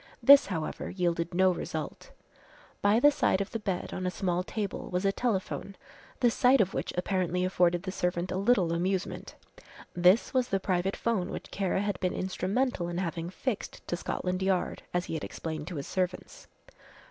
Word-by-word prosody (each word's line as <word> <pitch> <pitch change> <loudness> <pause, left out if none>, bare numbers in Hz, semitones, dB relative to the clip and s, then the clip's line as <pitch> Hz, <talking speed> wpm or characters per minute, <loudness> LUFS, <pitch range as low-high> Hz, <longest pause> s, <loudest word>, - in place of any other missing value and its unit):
This 280 -4 +9
however 165 -5 -3
yielded 170 -2 -1
no 185 +1 +5
result. 175 - -5 0.7
By 205 +3 +4
the 290 +4 +6
side 190 - +2
of 200 - -3
the 225 - -3
bed 195 -4 -3
on 185 0 -2
a - - +2
small 180 -1 -1
table 205 +1 -4
was 180 +2 -1
a 195 - +4
telephone, 195 -3 -2 0.5
the 240 -2 +5
sight 255 +3 +4
of 195 -2 +2
which - - -2
apparently 180 -1 0
afforded 175 -1 +2
the 190 - -3
servant 180 0 -1
a - - -1
little 195 -5 +3
amusement. 185 +2 -2 0.6
This 180 +5 +4
was 255 -2 +2
the 195 - 0
private 185 0 0
'phone 220 -6 -1
which - - -7
Kara 190 -1 0
had 205 -2 -2
been 180 -1 0
instrumental 190 +2 -1
in 175 0 -4
having 170 -2 -3
fixed 220 +4 -4
to - - 0
Scotland 180 +1 -3
Yard 190 -1 0
as 180 0 -1
he - - -5
had 160 - -3
explained 155 -2 -5
to 180 - -5
his 140 - -4
servants. 185 -1 -3
185 Hz, 180 wpm, -29 LUFS, 175-200 Hz, 0.7 s, This